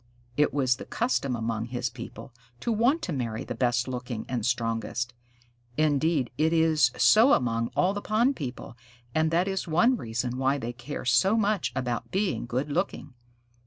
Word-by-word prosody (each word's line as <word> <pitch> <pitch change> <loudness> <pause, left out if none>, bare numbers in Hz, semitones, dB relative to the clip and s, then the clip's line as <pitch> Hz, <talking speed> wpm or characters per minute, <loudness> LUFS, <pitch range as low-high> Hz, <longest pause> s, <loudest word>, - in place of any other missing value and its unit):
It 150 +2 +3
was 130 -3 +1
the - - -8
custom 220 - -1
among 115 -1 -2
his 120 0 -3
people 115 0 -9 0.3
to 235 - -1
want 245 +9 +2
to 180 - -2
marry 115 -5 -3
the - - -5
best 120 0 +1
looking 125 -3 -5
and 120 -4 -2
strongest. 120 +1 -1 0.6
Indeed 155 -2 +1
it 160 +1 +3
is 160 -5 +4
so 230 +6 +6
among 115 -2 +1
all 185 +2 +2
the 205 - -4
pond 235 +7 +2
people, 125 -4 -6 0.4
and 160 0 +2
that 170 +3 +1
is 190 -1 -2
one 200 +11 +3
reason 120 - -3
why 135 +2 +2
they 120 -2 -4
care 130 +4 -7
so 195 - +4
much 210 -3 +1
about 125 -3 -2
being 190 - -1
good 130 +5 -2
looking. 150 -4 -2
135 Hz, 170 wpm, -27 LUFS, 120-180 Hz, 0.6 s, so